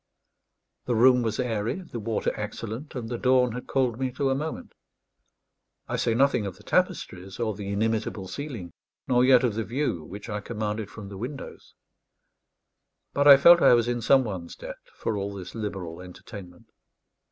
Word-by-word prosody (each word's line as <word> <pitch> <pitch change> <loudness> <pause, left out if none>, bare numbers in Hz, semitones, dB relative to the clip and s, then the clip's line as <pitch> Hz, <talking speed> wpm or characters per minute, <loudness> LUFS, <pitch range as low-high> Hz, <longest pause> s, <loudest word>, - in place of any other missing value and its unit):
The 120 - 0
room 125 +2 +6
was 110 -2 -2
airy, 115 -3 -1
the 125 -9 -7
water 110 +1 -1
excellent, 115 +6 -6
and 120 -3 -4
the 120 0 -4
dawn 125 -1 +3
had 125 +2 -7
called 125 -3 0
me 130 -1 -1
to 135 +1 0
a - - +3
moment. 155 +4 -5 1.1
I - - -2
say 115 - +1
nothing 130 -5 +2
of 95 - -7
the - - -17
tapestries 95 +3 -1
or 110 -2 0
the 100 0 -7
inimitable 110 -1 -1
ceiling, 120 - -6 0.4
nor 125 -1 +4
yet 130 0 +6
of 120 -4 +1
the 110 +2 -2
view 120 - -2
which 100 +7 -9
I 105 -2 -3
commanded 105 -1 -4
from 105 -3 -9
the 100 -1 -8
windows; 135 +5 -8 1.4
but 145 +1 +3
I 140 -1 +11
felt 170 +4 +7
I - - +7
was 120 0 +1
in 120 -1 -1
some 130 +4 +5
one's 95 -7 -6
debt - - -9 0.2
for 110 - -2
all 100 0 -4
this 90 -2 -8
liberal 95 -6 -5
entertainment. 90 0 -12
115 Hz, 175 wpm, -26 LUFS, 100-125 Hz, 1.4 s, I